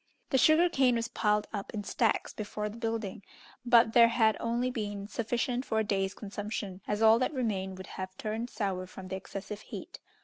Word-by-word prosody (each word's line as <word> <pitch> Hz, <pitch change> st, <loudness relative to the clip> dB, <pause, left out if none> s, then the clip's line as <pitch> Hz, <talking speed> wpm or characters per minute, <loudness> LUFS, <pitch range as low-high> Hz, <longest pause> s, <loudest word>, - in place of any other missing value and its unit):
The 265 Hz, -, +4 dB
sugar 315 Hz, +5 st, +6 dB
cane 265 Hz, -7 st, +3 dB
was 230 Hz, 0 st, -1 dB
piled 210 Hz, -3 st, +1 dB
up 200 Hz, -2 st, -4 dB
in 205 Hz, -, -3 dB
stacks 225 Hz, +3 st, 0 dB
before 210 Hz, 0 st, -4 dB
the 215 Hz, -, -9 dB
building, 225 Hz, -4 st, -3 dB, 0.4 s
but 235 Hz, -2 st, +5 dB
there 235 Hz, -1 st, +8 dB
had 225 Hz, -2 st, +3 dB
only 240 Hz, +2 st, 0 dB
been 205 Hz, -4 st, -4 dB
sufficient 240 Hz, +3 st, -1 dB
for 220 Hz, -, -2 dB
a 220 Hz, -, +3 dB
day's 195 Hz, -2 st, -1 dB
consumption, 205 Hz, -2 st, -5 dB
as 210 Hz, +1 st, 0 dB
all 225 Hz, +1 st, +7 dB
that 260 Hz, +4 st, 0 dB
remained 190 Hz, -7 st, -2 dB
would 190 Hz, -, -8 dB
have 185 Hz, 0 st, -7 dB
turned 225 Hz, +2 st, -3 dB
sour 190 Hz, -5 st, -2 dB
from 185 Hz, 0 st, -10 dB
the 190 Hz, -, -3 dB
excessive 195 Hz, +2 st, -7 dB
heat. -, -, -9 dB
220 Hz, 195 wpm, -30 LUFS, 200-235 Hz, 0.4 s, there